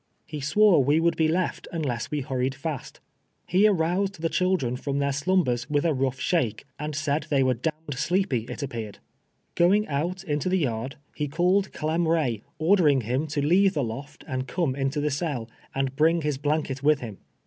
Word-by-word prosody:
He 150 -2 -6
swore 170 +2 +4
we 145 +4 +3
would 170 +1 +2
be 160 - +2
left 170 +3 -1
unless 135 -9 -2
we 150 -2 -2
hurried 130 -1 -2
fast. 140 0 -5 0.5
He 195 +4 +4
aroused 190 0 0
tlie 165 0 -1
chihlren 180 -10 +1
from 140 -1 -2
their 140 0 +1
slumbers 145 -6 +1
v»ilii 150 +3 +1
a - - +1
rougli 130 -1 -1
shake, 130 - 0
and 150 0 -4
said 150 0 -1
tliey 140 -2 +3
were 130 0 +3
d 125 +7 -1
— 160 - -33
d 130 - -4
sleepy, 150 - 0
it - - -5
appeared. 115 -6 -5 0.6
Going 200 +5 +3
out 170 +6 -2
into 150 -1 -1
the 190 - +2
yard, 130 -4 -2 0.2
lie 150 - 0
called 180 +6 +1
Clem 160 +2 -1
Ray, 145 -10 +1 0.2
ordering 155 -5 +4
him 125 +7 -1
to 145 -1 -1
leave 190 +5 +4
the 145 - +1
loft 135 +6 -7
and 130 0 -3
come 165 -8 -1
into 135 +2 -1
the 150 0 0
cell, 140 -6 -2 0.3
and 135 -1 -1
bring 160 +3 +3
his 150 -3 -1
blanket 145 -2 -1
with 150 0 +3
him. 110 -5 -7
150 Hz, 195 wpm, -26 LUFS, 135-170 Hz, 0.6 s, swore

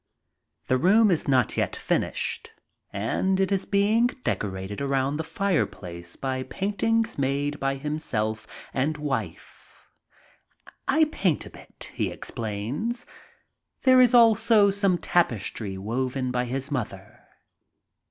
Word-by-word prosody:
The 130 - +1
room 205 - +5
is 170 - 0
not 130 -4 +2
yet - - -1
finished, - - -2 0.4
and 185 - 0
it 195 +1 +1
is 195 -1 0
being 210 +4 +3
decorated 100 - -4
around 140 +1 0
the 160 - -2
fireplace 125 - -2
by 130 -1 -3
paintings 220 - -1
made 140 +2 -1
by 135 0 0
himself 110 -7 -3 0.3
and 145 +4 0
wife. 145 -2 -6 1.0
"I 315 - +4
paint 200 - 0
a - - -11
bit," - - -12
he - - -1
explains. 120 - -4 0.8
There 255 -1 +7
is 250 -1 +5
also 225 -3 +6
some 195 -2 +2
tapestry 110 - -1
woven 130 +5 -2
by 125 0 0
his 135 +4 -4
mother. 105 -7 -5
145 Hz, 120 wpm, -26 LUFS, 120-200 Hz, 1.0 s, There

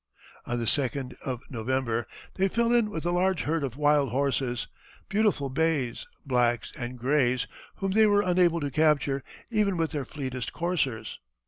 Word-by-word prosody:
On 120 - -1
the 120 - -2
2d 130 0 -1
of 130 -2 -4
November, 120 -1 -1 0.3
they 190 +1 +2
fell 235 +4 +1
in 235 -3 +3
with 165 -5 -5
a 175 - +1
large 180 -1 +1
herd 160 0 0
of 130 -2 -4
wild 145 -2 +3
horses, 130 -1 0 0.4
beautiful 205 -9 +2
bays, 145 -5 0 0.2
blacks, 120 -3 +1
and 125 -2 -5
grays, 125 -1 +2 0.3
whom 195 -1 -2
they 215 +2 +5
were 205 0 +4
unable 175 -2 +3
to 145 -1 -2
capture 145 -2 +2 0.3
even 210 -4 +2
with 165 -1 0
their 145 -4 -3
fleetest 130 -3 -5
coursers. 165 -10 -2
145 Hz, 160 wpm, -28 LUFS, 125-175 Hz, 0.4 s, they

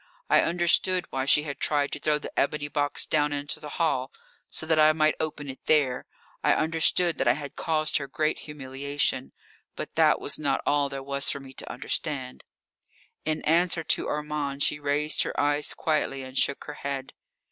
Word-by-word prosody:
I - - +7
understood 175 +2 +2
why 130 0 -1
she 150 +2 +5
had 145 -2 -6
tried 145 -1 +1
to - - -4
throw 150 0 +2
the 150 - -7
ebony 145 +1 0
box 145 -1 -1
down 150 -1 +1
into 145 0 -2
the 150 -1 -8
hall 140 -6 +1 0.4
so - - -4
that 160 -1 +2
I 155 0 +7
might 155 -1 +3
open 150 -2 -3
it 135 -1 -8
there 140 -5 +2 0.4
I - - +4
understood 165 +2 +2
that - - +1
I 120 - +6
had 140 +1 -7
caused 155 -1 +1
her 140 - -4
great 155 +3 0
humiliation. 140 - -2 0.4
But - - -6
that - - +5
was - - 0
not - - 0
all 145 -1 +2
there 135 -1 -5
was 140 0 +1
for 140 - -2
me 135 -1 -12
to - - -8
understand. 65 +1 -3 0.8
In 155 0 -1
answer 165 +1 +2
to - - +1
Armand 150 -2 -2
she 150 - +1
raised 145 +1 +1
her - - -2
eyes 145 +1 +1
quietly, 145 -4 -1
and 130 0 -10
shook 140 - +1
her 150 - -7
head. 135 -1 -4
145 Hz, 190 wpm, -27 LUFS, 140-155 Hz, 0.8 s, I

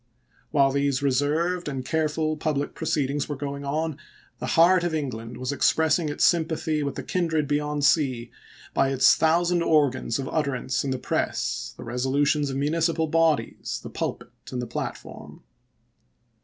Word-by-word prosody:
While 140 -2 +3
these 140 0 0
reserved 150 +6 +1
and 130 -2 -4
careful 155 0 0
public 150 -2 -2
proceedings 145 -3 -1
were 145 - -2
going 140 0 -5
on, 155 +2 -2 0.4
the - - -4
heart 175 +2 +6
of 175 -2 -1
England 120 -6 -4
was 130 +2 -3
expressing 160 +2 +2
its 145 - +1
sympathy 160 -2 +1
with 140 -1 -3
the - - -5
kindred 165 -5 0
beyond 145 0 0
sea 130 -7 +2 0.4
by 135 - +2
its 135 -1 +5
thousand 170 +2 +2
organs 145 -8 +2
of 135 - -4
utterance 135 -4 -1
in 140 - -2
the 130 - -1
press, - - -2
the - - -8
resolutions 140 +4 0
of 135 - -3
municipal 160 +3 +1
bodies, 160 -1 0
the - - -8
pulpit, - - -4 0.2
and 125 - -3
the 125 - -2
platform. 120 - -7
145 Hz, 155 wpm, -25 LUFS, 135-160 Hz, 0.4 s, heart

